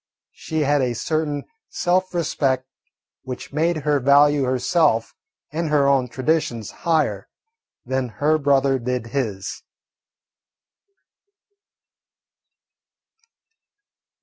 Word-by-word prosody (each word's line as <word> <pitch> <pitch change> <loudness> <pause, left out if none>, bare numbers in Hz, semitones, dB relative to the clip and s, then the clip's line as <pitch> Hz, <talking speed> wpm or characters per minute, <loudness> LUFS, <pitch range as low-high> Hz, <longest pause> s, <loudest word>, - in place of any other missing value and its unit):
She 160 -1 -4
had 145 0 +2
a 125 -2 0
certain 150 +1 -2 0.3
self 185 - 0
respect 135 -6 0 0.6
which 130 +1 -8
made 165 +3 +1
her 145 -1 +2
value 140 +1 +4
herself 130 - +1 0.4
and 160 +1 -2
her 145 -2 +3
own 135 -2 +3
traditions 125 -3 -1
higher 160 -2 0 0.6
than 130 0 -1
her 155 +2 +3
brother 140 -2 +2
did 125 0 -2
his. 105 -7 -3
140 Hz, 90 wpm, -22 LUFS, 130-155 Hz, 0.6 s, value